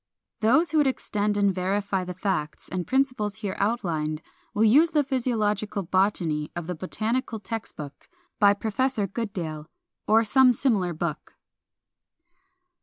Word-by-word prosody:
Those 270 +9 +3
who 315 - +3
would 290 - +4
extend 210 -5 -1
and 200 -1 +3
verify 195 +1 -1
the 180 0 -6
facts 180 -6 -3
and 180 -1 -4
principles 255 -6 0
here 210 -3 -4
outlined 165 -8 -1 0.3
will 210 - +1
use 285 +10 +6
the 300 -2 +2
Physiological 215 -6 -1
Botany 170 -5 0
of 175 -1 -4
the 180 - -3
"Botanical 220 +7 -2
Text 225 +1 -6
Book," 145 -2 -9 0.3
by 205 -1 +6
Professor 225 +2 0
Goodale, 180 -8 -5 0.4
or 220 +1 +5
some 255 +3 +5
similar 205 -9 +1
book. 155 -1 -4
205 Hz, 135 wpm, -26 LUFS, 180-235 Hz, 0.4 s, use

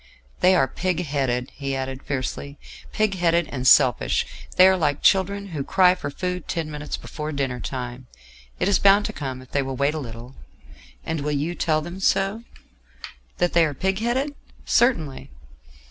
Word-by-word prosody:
"They 185 +1 +5
are 135 -7 +3
pig 180 +4 -2
headed," 130 -4 -1
he 135 -1 -4
added 130 0 -4
fiercely; 140 +1 -4 0.3
"pig 215 -2 +1
headed 170 -2 +2
and 130 -2 -2
selfish; 125 -2 +4 0.3
they 185 - +8
are 190 - +5
like 150 -5 0
children 200 +1 +2
who 150 -5 -4
cry 180 +4 +4
for 165 -6 -5
food 180 +4 -4
ten 165 -3 -3
minutes 150 0 -5
before 155 0 -6
dinner 135 -4 -2
time: 125 +1 -6 0.5
it - - +1
is 200 - +3
bound 200 +1 +5
to 215 - -4
come 130 -5 -5
if 130 - -20
they 140 - +1
will 135 -1 -4
wait 140 +3 +1
a 155 - -3
little." 120 -1 -9 0.7
"And 160 -1 -2
you 145 +2 -1
will 175 - -5
tell 155 -3 +1
them 175 +3 -7
so?" 195 +3 +1 0.9
"That 175 0 +1
they 170 - +5
are 150 -3 -1
pig 190 +6 -1
headed? 260 +6 -1 0.3
Certainly." 195 - +1
155 Hz, 175 wpm, -23 LUFS, 135-185 Hz, 0.9 s, they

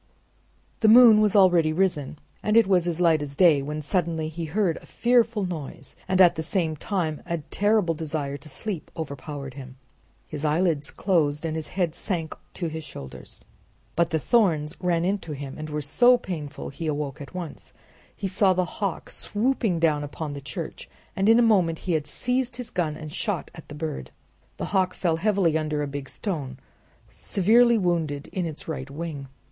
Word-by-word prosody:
The 220 - +3
moon 225 -1 +8
was 210 -1 +2
already 175 -5 +5
risen 155 -4 0 0.2
and 215 +1 +2
it 230 - +7
was 180 -3 +2
as 170 -1 -2
light 165 -3 +4
as 140 -1 -5
day, 160 -4 +5
when 150 +2 -4
suddenly 160 -1 -1
he 165 +1 -5
heard 175 +1 0
a - - -12
fearful 235 -4 +2
noise, 160 -6 -6
and 185 0 +1
at 180 -2 +7
the 160 - -4
same 160 -1 -1
time 160 -2 -2
a 170 -1 -1
terrible 205 +3 +1
desire 150 -3 -3
to 145 +2 -10
sleep 180 +5 -4
overpowered 140 -3 -6
him. 130 -1 -10 0.5
His 150 -1 -6
eyelids 155 -1 +1
closed 160 -5 0
and 160 -1 -2
his 160 -2 -4
head 180 -4 -1
sank 170 -4 -3 0.3
on 170 -3 -1
his 160 0 -5
shoulders, 70 - -10 0.5
but 170 0 +2
the 160 - +1
thorns 160 - +2
ran 175 -2 +1
into 190 -5 -2
him 140 -1 -6
and 155 0 -6
were 150 0 -2
so 245 - +5
painful 150 -11 -6
that 140 - -21
he 165 - -3
awoke 145 -1 -3
at 145 - -10
once. 145 - -7 0.4
He 195 - -3
saw 190 0 +3
the 180 0 +1
hawk 195 0 -4
swooping 220 -4 0
down 155 -3 +2
upon 145 +1 -5
the 140 - -7
church, 160 +3 -7 0.3
and 195 +2 +2
in 225 - +7
a 240 - +5
moment 185 -8 +3
he 180 - -4
had 150 -2 -1
seized 250 - -1
his 250 -1 -5
gun 155 -4 -1
and 155 -1 -8
shot 205 -8 -2
at 160 - -12
the 150 - -8
bird. 150 - -5 0.5
The - - -3
hawk 185 -2 +2
fell 165 -3 0
heavily 190 -3 +2
under 150 -1 -1
a - - -2
big 140 -1 -6
stone, 145 - -4 0.6
severely 235 +5 +4
wounded 165 -7 -1
in 180 -3 -2
its 155 -2 -8
right 140 -4 -5
wing. 145 -2 -6
165 Hz, 190 wpm, -25 LUFS, 150-190 Hz, 0.6 s, moon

